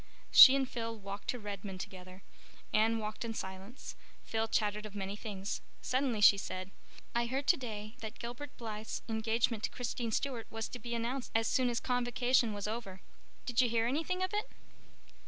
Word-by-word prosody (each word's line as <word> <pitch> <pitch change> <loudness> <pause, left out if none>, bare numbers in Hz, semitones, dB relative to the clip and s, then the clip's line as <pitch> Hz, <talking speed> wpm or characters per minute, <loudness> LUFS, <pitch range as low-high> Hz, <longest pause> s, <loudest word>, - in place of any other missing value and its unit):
She 265 - +11
and 270 -1 +1
Phil 230 -2 -4
walked 200 0 -7
to 250 - 0
Redmond 200 -3 -6
together. 185 0 -9 0.5
Anne 225 +1 +4
walked 215 0 -4
in 225 -1 -4
silence; 190 +6 -7 0.3
Phil 225 0 -1
chattered 210 -1 0
of 210 - -13
many 195 0 -3
things. 205 -2 -4 0.2
Suddenly 255 -4 0
she 200 -1 +8
said, 185 0 -5 0.4
"I 235 0 +1
heard 270 +3 -2
today 215 -5 0
that 220 0 -7
Gilbert 245 +4 -7
Blythe's 220 -2 -5
engagement 225 0 +1
to - - -4
Christine 240 -1 -3
Stuart 245 -1 -1
was 225 0 -4
to 250 - -7
be 235 +1 -4
announced 245 +3 -2
as 225 0 +3
soon 255 +1 +2
as 235 -1 0
Convocation 245 -1 +2
was 205 0 -3
over. 210 -4 -5 0.4
Did 245 0 +3
you 245 - +3
hear 230 0 +2
anything 325 +9 0
of 370 - -2
it?" 420 +4 -1
225 Hz, 175 wpm, -33 LUFS, 210-245 Hz, 0.5 s, She